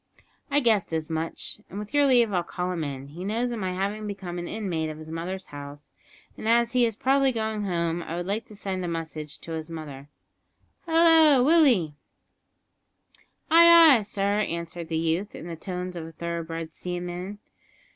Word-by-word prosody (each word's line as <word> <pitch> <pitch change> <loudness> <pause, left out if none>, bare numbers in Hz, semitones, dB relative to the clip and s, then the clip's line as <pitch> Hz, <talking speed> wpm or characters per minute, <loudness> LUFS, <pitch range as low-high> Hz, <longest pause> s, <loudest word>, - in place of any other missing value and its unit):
"I 290 +1 +2
guessed 220 -8 +2
as 160 0 -2
much, 160 +5 -4
and 195 - -8
with 210 +4 -7
your 290 -1 +4
leave 240 -5 +4
I'll 180 - +2
call 180 +1 -4
him 170 -3 -2
in. 140 -1 -6
He 170 +5 -8
knows 230 +5 -1
of 235 - -4
my 185 -2 -2
having 200 +3 -3
become 190 -4 -5
an 175 - -5
inmate 175 -7 -3
of 155 - -7
his 155 0 -10
mother's 180 +4 -5
house, 145 0 -10 0.4
and 220 - -4
as 235 +1 +3
he 245 -2 +4
is 225 - -4
probably 270 +3 +2
going 220 -3 -2
home 170 -2 -1
I 165 - -5
would 175 0 -3
like 210 +4 -3
to 210 - -12
send 190 -2 -4
a - - -2
message 160 -3 -5
to 165 - -9
his 160 0 -5
mother. 145 -4 -8 0.8
Hallo, 320 -5 +6
Willie." 260 - +4 1.6
"Ay, 335 -3 +9
ay, - - -4
sir!" 200 0 -1
answered 170 -3 -4
the 160 -1 -2
youth, 165 +5 -1
in - - -8
the 170 -1 -6
tones 180 +1 -5
of 165 -2 -6
a - - -10
thoroughbred 165 -1 -5
seaman. 180 +2 -5
180 Hz, 185 wpm, -26 LUFS, 165-220 Hz, 1.6 s, Ay